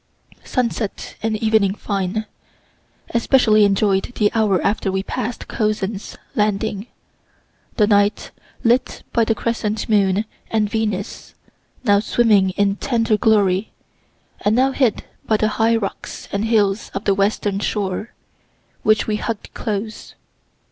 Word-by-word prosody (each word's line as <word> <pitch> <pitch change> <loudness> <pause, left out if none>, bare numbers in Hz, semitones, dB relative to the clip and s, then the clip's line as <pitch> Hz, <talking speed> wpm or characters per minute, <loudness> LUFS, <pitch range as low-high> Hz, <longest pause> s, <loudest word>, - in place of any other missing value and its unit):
Sunset 235 -4 -2
and 220 -1 0
evening 215 -3 +2
fine. 200 +1 -2 0.9
Especially 230 -3 +4
enjoy'd 195 +1 +1
the 210 -1 +2
hour 210 -5 +2
after 200 -1 0
we 190 0 -1
passed 230 +4 -4
Cozzens's 210 -2 -2 0.2
landing 210 0 -1 0.9
the 210 - +4
night 205 0 +2 0.3
lit 245 +2 +1
by 230 - +3
the 225 0 +1
crescent 220 -2 -2
moon 200 -1 +2 0.2
and 215 -1 +1
Venus, 210 -2 -3 0.5
now 205 -4 +4
swimming 210 -3 +3
in 200 0 +2
tender 230 -3 +1
glory, 210 -3 +2 0.7
and 210 +1 +3
now 265 +2 +3
hid 255 -5 +1 0.2
by 215 - +3
the 215 0 +1
high 225 +1 +2
rocks 210 -3 -5
and 200 +2 -1
hills 210 -2 +1
of 195 - -3
the 200 - +4
western 200 0 0
shore, 205 +1 -2 0.7
which 215 0 +3
we 215 -1 -1
hugg'd 225 -1 -5
close. 215 0 -5
215 Hz, 125 wpm, -20 LUFS, 200-225 Hz, 0.9 s, Especially